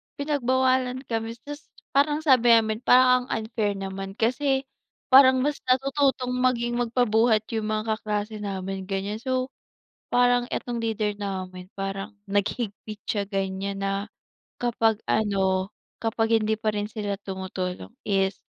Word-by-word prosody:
pinagbawalan 260 -2 +1
kami. 225 0 -2
Tas 290 +1 -9 0.2
parang 295 +2 +2
sabi 250 -5 +6
namin, 220 -1 +1
"Parang 255 0 +5
ang 220 - -2
unfair 215 -2 -1
naman. 195 0 -6
Kasi 265 +4 +1 0.5
parang 260 -1 +8
mas 295 0 -1
natututong 265 0 +2
maging 240 -1 +1
magpabuhat 230 -2 +2
yung 220 -2 -2
mga 215 0 -1
kaklase 210 0 -3
namin." 195 -1 -4
Ganyan. 200 +2 -3
So, 255 0 -1 0.6
parang 245 0 +4
etong 240 -1 -3
leader 215 -2 -1
namin, 185 -2 -5
parang 195 +2 -4 0.2
naghigpit 210 +1 -2
siya 205 -2 0
ganyan 195 0 -3
na 195 +1 -1 0.5
kapag 225 -2 +2
ano, 190 -3 +1 0.3
kapag 225 0 +1
hindi 220 0 0
pa 220 -1 0
rin 205 0 -2
sila 205 -2 -3
tumutulong 185 - -5 0.2
is 195 -1 +1
220 Hz, 130 wpm, -25 LUFS, 200-250 Hz, 0.6 s, parang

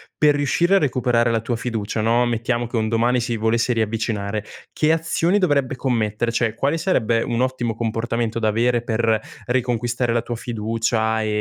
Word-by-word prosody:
per 150 -1 +4
riuscire 170 +6 +2
a - - +7
recuperare 125 -6 +1
la 115 -1 0
tua 120 +2 -2
fiducia, 110 -2 -3
no, 115 +2 +3
mettiamo 120 +1 -1
che 120 - -3
un 110 -1 0
domani 120 +2 +2
si 120 -1 -2
volesse 115 +2 +1
riavvicinare, 110 -2 -2 0.3
che 155 0 +2
azioni 165 +4 +1
dovrebbe 140 -8 +1
commettere? 115 -3 -1
Cioè, 115 -1 0
quale 140 +7 0
sarebbe 115 - +1
un 120 -1 -1
ottimo 125 -3 -1
comportamento 115 0 -2
da 110 -1 +1
avere 120 +2 +1
per 110 -1 +1 0.3
riconquistare 120 -1 0
la 115 - +1
tua 120 0 -5
fiducia 110 -1 -1
e - - -2
120 Hz, 175 wpm, -21 LUFS, 115-125 Hz, 0.3 s, a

